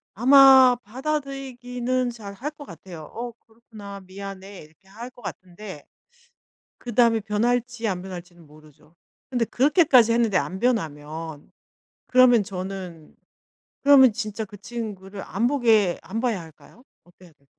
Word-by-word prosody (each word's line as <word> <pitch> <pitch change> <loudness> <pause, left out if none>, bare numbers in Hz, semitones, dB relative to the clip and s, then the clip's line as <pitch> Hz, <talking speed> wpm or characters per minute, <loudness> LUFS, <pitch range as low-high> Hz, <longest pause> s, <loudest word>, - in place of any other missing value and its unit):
아마 265 +1 +7
받아들이기는 255 -1 -3
잘 210 -4 -10
할 265 +9 -5
것 295 -1 -12
같아요. 170 - -11
"어 240 +1 -6
그렇구나 220 -3 -12
미안해." 195 0 -9
이렇게 155 +5 -20
할 225 +5 -9
것 250 -1 -19
같은데 185 -3 -9 0.9
그다음에 235 -1 +2
변할지 235 +2 -1
안 180 -2 -3
변할지는 175 -3 -10
모르죠. 155 +1 -20 0.4
근데 245 -3 0
그렇게까지 265 - +4
했는데 230 -4 +1
안 185 0 -1
변하면 160 - -3 0.6
그러면 250 -3 +5
저는 185 -4 -8 0.7
그러면 275 -4 +7
진짜 215 -1 -4
그 205 0 -13
친구를 200 -2 -7
안 230 +5 -1
보게 225 -9 +2
안 200 +6 -6
봐야 235 -6 -1
할까요? 165 - -17 0.2
어때야 175 -1 -20
될까. 140 -2 -35
215 Hz, 295 characters per minute, -24 LUFS, 185-245 Hz, 0.9 s, 아마